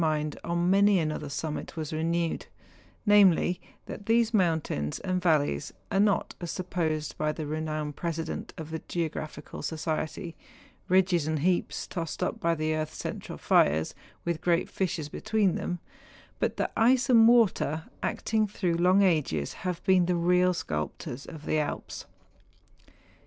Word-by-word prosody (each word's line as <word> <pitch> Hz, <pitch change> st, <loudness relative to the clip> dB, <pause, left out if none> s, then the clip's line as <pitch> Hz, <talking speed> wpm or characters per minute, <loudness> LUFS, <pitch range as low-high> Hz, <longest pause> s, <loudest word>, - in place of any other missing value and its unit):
53 160 Hz, -, +3 dB
mind 150 Hz, -1 st, -2 dB
on 170 Hz, +1 st, +1 dB
many 200 Hz, +1 st, +5 dB
another 155 Hz, -3 st, -2 dB
summit 150 Hz, +3 st, -4 dB
was 155 Hz, -1 st, -4 dB
renewed; 165 Hz, +1 st, -1 dB, 0.6 s
namely, 195 Hz, -4 st, +5 dB, 0.2 s
that 205 Hz, -, -8 dB
these 230 Hz, 0 st, +3 dB
mountains 160 Hz, -, +1 dB
and 185 Hz, -1 st, -1 dB
valleys 150 Hz, -, +1 dB, 0.2 s
are 195 Hz, -, +2 dB
not, 205 Hz, -2 st, +2 dB
as 175 Hz, -, -3 dB
sup¬ 185 Hz, -1 st, -6 dB
posed 155 Hz, -3 st, -1 dB
by 155 Hz, 0 st, +1 dB
the 155 Hz, 0 st, -5 dB
renowned 155 Hz, -1 st, -3 dB
President 165 Hz, 0 st, -4 dB
of 160 Hz, -1 st, -7 dB
the 160 Hz, -, -4 dB
Geographical 160 Hz, -2 st, -4 dB
Society, 160 Hz, +1 st, -3 dB, 0.5 s
ridges 180 Hz, -4 st, +3 dB
and 155 Hz, 0 st, 0 dB
heaps 180 Hz, +2 st, 0 dB
tossed 165 Hz, -3 st, -4 dB
up -, -, -2 dB
by 170 Hz, 0 st, +1 dB
the 155 Hz, 0 st, 0 dB
earth's 155 Hz, 0 st, -3 dB
central -, -, -5 dB
fires, 80 Hz, +2 st, +3 dB, 0.3 s
with 170 Hz, -2 st, -1 dB
great 170 Hz, -1 st, +2 dB
fissures 175 Hz, -5 st, -2 dB
between 210 Hz, +3 st, +1 dB
them, 180 Hz, -, -3 dB, 0.6 s
but -, -, 0 dB
that -, -, -1 dB
ice 245 Hz, +2 st, +4 dB
and 230 Hz, -3 st, +7 dB
water, 205 Hz, -9 st, +3 dB, 0.2 s
acting 220 Hz, -1 st, 0 dB
through 185 Hz, -3 st, -1 dB
long 185 Hz, +3 st, +4 dB
ages, 145 Hz, -, +1 dB
have 180 Hz, -2 st, -4 dB
been 185 Hz, -2 st, +4 dB
the 180 Hz, -, +2 dB
real 180 Hz, +1 st, +3 dB
sculptors 75 Hz, -, -4 dB
of 155 Hz, -2 st, -9 dB
the 155 Hz, -, +1 dB
Alps. 150 Hz, -, -4 dB
170 Hz, 150 wpm, -28 LUFS, 155-185 Hz, 0.6 s, and